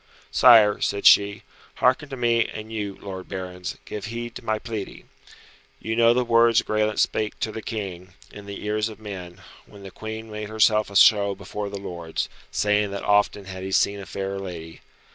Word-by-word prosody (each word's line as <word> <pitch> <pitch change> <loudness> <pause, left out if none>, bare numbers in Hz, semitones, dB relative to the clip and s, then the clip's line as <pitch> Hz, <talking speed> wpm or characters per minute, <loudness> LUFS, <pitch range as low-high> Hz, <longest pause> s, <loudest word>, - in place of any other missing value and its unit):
"Sire," 110 -4 +6
said 100 - -1
she, 100 0 +5 0.3
"hearken 130 +3 +2
to 135 - -6
me, 120 -1 +2
and 110 +1 -8
you, 105 -3 -4
lord 95 -2 -8
barons, 90 -1 -6
give 105 - -6
heed 120 +1 -5
to - - -9
my 110 -1 0
pleading. 110 -2 -7 0.7
You 110 - -3
know 115 0 +5
the 125 0 +1
words 115 0 +4
Graelent 110 0 0
spake 110 -1 0
to 110 - -1
the 110 - -6
King, 95 -5 -6 0.2
in 105 -1 -11
the 100 +1 -7
ears 105 +1 0
of 110 - -11
men, 95 -4 -8 0.3
when 100 -1 -14
the 95 - -9
Queen 110 +2 -7
made 105 0 -6
herself 110 -1 +3
a 100 - -11
show 100 -1 +5
before 105 +1 -6
the 100 - -6
lords, 85 -4 -5 0.2
saying 105 0 +1
that 100 0 -5
often 105 -1 +2
had 95 -1 -8
he 95 +1 -5
seen 100 +1 +2
a 100 - -9
fairer 95 0 -4
lady. 85 -4 -8
105 Hz, 190 wpm, -24 LUFS, 100-110 Hz, 0.7 s, Sire